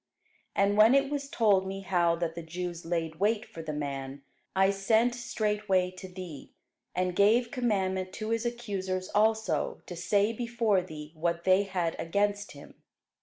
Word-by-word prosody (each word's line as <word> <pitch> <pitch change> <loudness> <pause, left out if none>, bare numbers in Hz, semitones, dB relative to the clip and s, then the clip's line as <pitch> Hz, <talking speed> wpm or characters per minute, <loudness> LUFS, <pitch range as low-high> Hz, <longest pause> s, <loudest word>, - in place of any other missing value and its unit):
And 200 +1 +2
when 220 +5 +7
it 275 0 +2
was 280 -1 -3
told 200 -7 +3
me 195 +1 -4
how 175 -3 +2
that 165 -1 -2
the 170 - -6
Jews 175 +1 -5
laid 165 -2 -2
wait 210 +2 +1
for 165 - -9
the 160 -1 -4
man, 140 -2 -5 0.3
I 190 +1 +4
sent 220 +5 +2
straightway 210 -6 0
to 185 +1 -9
thee, 180 -6 -9 0.4
and 180 0 0
gave 230 +5 +4
commandment 190 -7 0
to 215 0 -4
his 230 0 0
accusers 195 -6 -3
also 215 -6 +1
to 175 - -7
say 200 +5 +1
before 230 -4 +1
thee 150 -3 -9
what 170 +1 -1
they 190 +2 +4
had 180 -4 -1
against 205 +4 0
him. 145 0 -14
190 Hz, 165 wpm, -29 LUFS, 170-215 Hz, 0.4 s, when